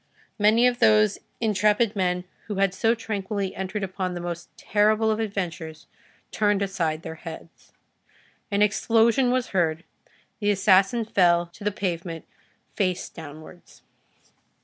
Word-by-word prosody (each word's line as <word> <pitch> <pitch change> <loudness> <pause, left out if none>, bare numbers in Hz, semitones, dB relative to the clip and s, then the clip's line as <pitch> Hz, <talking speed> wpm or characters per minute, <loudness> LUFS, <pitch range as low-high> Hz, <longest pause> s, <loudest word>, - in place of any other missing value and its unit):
Many 215 +3 +5
of 245 -1 +2
those 215 -1 +4 0.2
intrepid 210 0 +2
men, 180 -2 0 0.2
who 210 - -4
had 195 -1 +1
so 225 +4 +2
tranquilly 200 -3 -3
entered 190 +2 -4
upon 185 -1 -3
the - - -4
most 175 0 -6
terrible 215 +1 +2
of 215 - -1
adventures, 175 -7 -4 0.5
turned 205 -2 +1
aside 165 -5 -2
their 160 - -6
heads. 165 -1 -11 0.8
An 205 -1 +2
explosion 230 +4 +3
was 250 -1 0
heard, 170 -3 0 0.6
the 205 -2 0
assassin 195 +3 +3
fell 175 -5 +3
to - - -12
the 210 - +2
pavement 170 -4 -4 0.5
face 185 -3 -1
downwards. 155 +2 -12
195 Hz, 130 wpm, -25 LUFS, 175-215 Hz, 0.8 s, Many